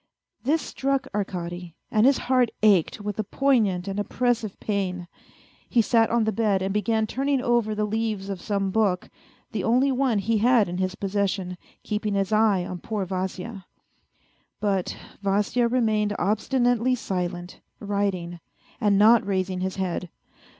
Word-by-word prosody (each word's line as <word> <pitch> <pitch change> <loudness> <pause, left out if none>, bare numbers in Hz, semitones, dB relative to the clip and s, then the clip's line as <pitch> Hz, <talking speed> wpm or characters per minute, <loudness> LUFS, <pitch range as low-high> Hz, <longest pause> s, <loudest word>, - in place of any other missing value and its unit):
This 300 +5 +1
struck 275 0 -1
Arkady, 175 -4 -4 0.2
and 220 +3 +4
his 275 - +4
heart 255 -2 +3
ached 205 -2 +3
with 205 0 -4
a - - +1
poignant 210 -6 +1
and 195 +1 -3
oppressive 230 0 -1
pain. 185 -4 -2 0.6
He 235 -3 +3
sat 225 0 +3
on 235 -1 +2
the 220 - +1
bed 205 -3 +1
and 195 0 -1
began 220 +2 +1
turning 270 +4 0
over 240 -4 +1
the 210 0 0
leaves 215 -2 -2
of 195 -2 -5
some 200 -2 -1
book, 195 -4 0 0.4
the - - -2
only 255 +4 +3
one 255 -3 +1
he 215 +2 +1
had 235 -2 +4
in 180 +1 -4
his 185 0 -1
possession, 195 -2 -2 0.3
keeping 210 -1 -2
his 195 +1 0
eye 210 -4 +3
on 180 -1 -6
poor 210 -1 -3
Vasya. 185 +2 -5 0.9
But 195 -3 -1 0.2
Vasya 205 +4 +1
remained 215 -4 +1
obstinately 245 +4 +1
silent, 180 -5 -4 0.2
writing, 195 -4 -2 0.4
and 205 -3 +3
not 220 +3 +6
raising 190 -2 -1
his 190 0 -2
head. 180 -2 -3
205 Hz, 150 wpm, -25 LUFS, 190-230 Hz, 0.9 s, not